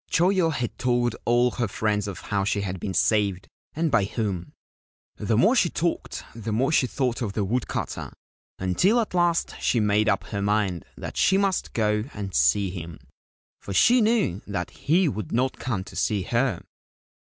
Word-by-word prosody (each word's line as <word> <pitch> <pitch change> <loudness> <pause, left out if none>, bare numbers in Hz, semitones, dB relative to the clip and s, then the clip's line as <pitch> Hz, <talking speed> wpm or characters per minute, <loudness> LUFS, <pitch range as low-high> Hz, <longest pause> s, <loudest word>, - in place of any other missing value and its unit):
Choyo 180 0 +3
had 125 -5 -4
told 120 -2 +1
all 120 +1 +3
her 120 -1 -1
friends 105 0 -1
of 95 -4 -6
how 100 -1 -1
she 100 +1 0
had 95 -2 -4
been 95 +2 -4
saved 100 -4 +1 0.3
and 160 0 0
by 100 - +3
whom. 100 -5 -3 0.6
The - - 0
more - - +4
she - - +3
talked - - -2
the 115 -1 -5
more 130 +7 +1
she 135 -5 +3
thought 125 -1 -1
of 105 -4 -2
the 105 -1 -1
wood 120 +4 -1
cutter, - - -4 0.5
until 180 - +2
at 225 - -2
last 175 -2 +1
she 120 - +2
made 105 0 +2
up 100 -2 +1
her 100 -2 -4
mind 100 -5 0
that - - -7
she 190 - +4
must 195 -2 0
go 105 -1 +1
and 100 -2 -5
see 90 +9 +3
him, 85 -3 -7 0.6
for 100 - -6
she 245 - +5
knew 215 - +1
that 100 -4 -3
he 170 +4 +2
would 105 - -4
not 130 +3 0
come 105 -8 -2
to - - -13
see 100 +1 0
her. 120 +5 0
110 Hz, 185 wpm, -25 LUFS, 100-130 Hz, 0.6 s, she